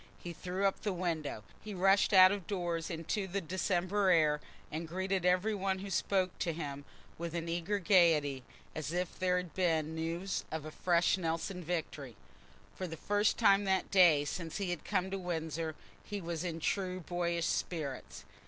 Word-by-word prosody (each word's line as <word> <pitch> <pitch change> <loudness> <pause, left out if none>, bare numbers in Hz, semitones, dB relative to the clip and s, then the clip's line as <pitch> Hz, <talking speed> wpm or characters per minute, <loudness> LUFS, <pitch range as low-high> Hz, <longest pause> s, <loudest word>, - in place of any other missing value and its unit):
He 175 - -7
threw 180 +3 -3
up 195 - +1
the 205 -3 -1
windows, 165 - -3 0.2
he 210 -2 -6
rushed 195 +2 +4
out 185 -1 +9
of 200 -3 -4
doors 175 -5 -2
into 170 +4 -2
the 195 +2 -2
December 185 +2 0
air, 155 -4 +4 0.3
and 160 +2 -4
greeted 190 +1 -1
every 185 +4 +2
one 195 -1 -1
who 195 +1 -7
spoke 185 0 +1
to 170 - 0
him 145 -3 -5 0.3
with 170 0 -4
an 170 0 -3
eager 175 +4 -1
gaiety, 165 -8 +4 0.3
as 155 0 -4
if 180 0 -3
there 180 -1 +2
had 180 -2 -4
been 160 -4 +1
news 165 +4 -2
of 155 -1 -4
a 155 - -6
fresh 175 +2 +2
Nelson 170 +2 -2
victory. 155 -7 -4 0.6
For 185 - -4
the 165 -1 -7
first 205 +4 +1
time 200 -3 +5
that 190 -1 0
day 170 -7 +6
since 165 +2 -4
he 195 -3 -2
had 175 - -4
come 190 -2 -1
to 195 - -2
Windsor, 160 -3 -3 0.3
he 205 - -5
was 170 -2 -4
in 165 -2 -3
true 185 +2 -1
boyish 170 0 -1
spirits. 150 -8 -3
175 Hz, 180 wpm, -33 LUFS, 160-190 Hz, 0.6 s, out